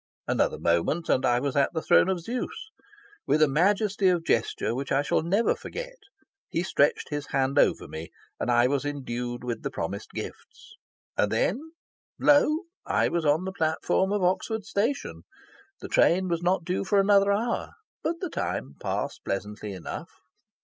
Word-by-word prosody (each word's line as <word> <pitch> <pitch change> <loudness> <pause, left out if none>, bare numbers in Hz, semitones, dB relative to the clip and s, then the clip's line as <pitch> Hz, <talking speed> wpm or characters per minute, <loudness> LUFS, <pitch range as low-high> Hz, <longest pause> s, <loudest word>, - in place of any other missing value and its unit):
Another - - +1
moment, 85 - 0
and 130 - +3
I 120 0 +3
was 140 0 -2
at 140 +3 +2
the 160 - -1
throne - - +5
of 185 -2 -1
Zeus. 250 - -5 0.6
With 145 +2 +3
a - - +5
majesty 195 +6 +2
of 175 -2 +2
gesture 115 0 0
which 135 +3 -4
I 140 +1 +3
shall - - +1
never 195 +8 +2
forget, - - -7 0.5
he 170 - -1
stretched 145 -6 +1
his 145 -1 -4
hand 135 0 +1
over - - +2
me, 80 +1 -7 0.3
and - - -2
I 120 0 +4
was 140 +1 +1
indued 125 -4 -4
with 120 -3 -3
the - - -3
promised - - -5
gifts. - - -9 0.4
And 105 - +1
then, 255 - -1 0.4
lo! 300 +2 +4 0.2
I - - +1
was 170 -2 -1
on 155 +5 +2
the 190 - -3
platform 160 +3 +1
of 205 -2 0
Oxford 200 +4 0
station. 220 - -1 0.6
The - - -6
train 185 +2 +3
was 170 -1 0
not 175 -1 +1
due 180 +2 -1
for 200 +1 +2
another 200 0 +4
hour. 230 +4 -1 0.3
But 335 - -1
the 365 - -2
time 70 +2 -3
passed - - -3
pleasantly 105 +1 -4
enough. 95 -3 -7
165 Hz, 170 wpm, -27 LUFS, 130-200 Hz, 0.6 s, throne